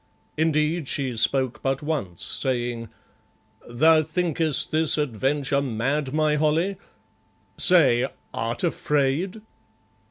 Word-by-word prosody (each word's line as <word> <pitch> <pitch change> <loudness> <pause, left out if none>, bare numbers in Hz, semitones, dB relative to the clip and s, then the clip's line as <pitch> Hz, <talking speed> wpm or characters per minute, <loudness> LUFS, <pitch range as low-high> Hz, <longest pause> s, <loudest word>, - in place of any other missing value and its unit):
Indeed, 155 0 0
she 130 -4 -2
spoke 130 +2 0
but 135 +2 -2
once, 140 - -4
saying 120 -3 -2 0.8
"Thou 155 +6 +4
thinkest 160 -2 -1
this 155 0 +1
adventure 140 +1 -1
mad, 135 +3 -2
my 155 0 +1
Holly? 160 +6 0 0.8
Say, 130 -9 +6 0.3
art 115 +5 -4
afraid?" 160 +5 -1
145 Hz, 95 wpm, -23 LUFS, 130-160 Hz, 0.8 s, Say